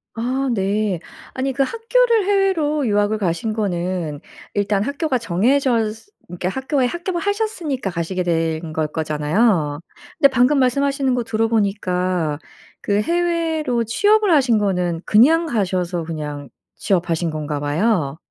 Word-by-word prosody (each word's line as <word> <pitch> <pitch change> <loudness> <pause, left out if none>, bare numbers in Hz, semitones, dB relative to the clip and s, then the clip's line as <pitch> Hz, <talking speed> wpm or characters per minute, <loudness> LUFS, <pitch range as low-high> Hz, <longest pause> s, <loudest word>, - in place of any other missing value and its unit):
아 255 +4 -1
네. 200 -2 0 0.3
아니 265 0 -2
그 275 - +2
학교를 460 - +2
해외로 335 - +1
유학을 205 +1 +1
가신 190 +3 -1
거는 180 -7 -2 0.3
일단 205 0 0
학교가 280 +1 -1
정해져 230 +3 +1
스 225 - -15 0.2
그러니까 180 +1 -3
학교에 265 +3 -1
합격을 345 +3 -3
하셨으니까 400 - -2
가시게 175 +1 -2
된 165 -1 -1
걸 155 -1 0
거잖아요. 155 +1 0 0.4
근데 280 - +6
방금 260 +3 +3
말씀하시는 275 +1 +1
거 245 - -1
들어보니까 195 -8 0 0.4
그 205 0 0
해외로 330 -5 0
취업을 415 - +3
하신 260 -7 +4
거는 180 -5 0
그냥 310 +10 +5
가셔서 185 - -1
그냥 150 -4 -6 0.3
취업하신 175 -4 0
건가 150 -1 -3
봐요. 155 -1 0
215 Hz, 300 characters per minute, -20 LUFS, 175-280 Hz, 0.4 s, 근데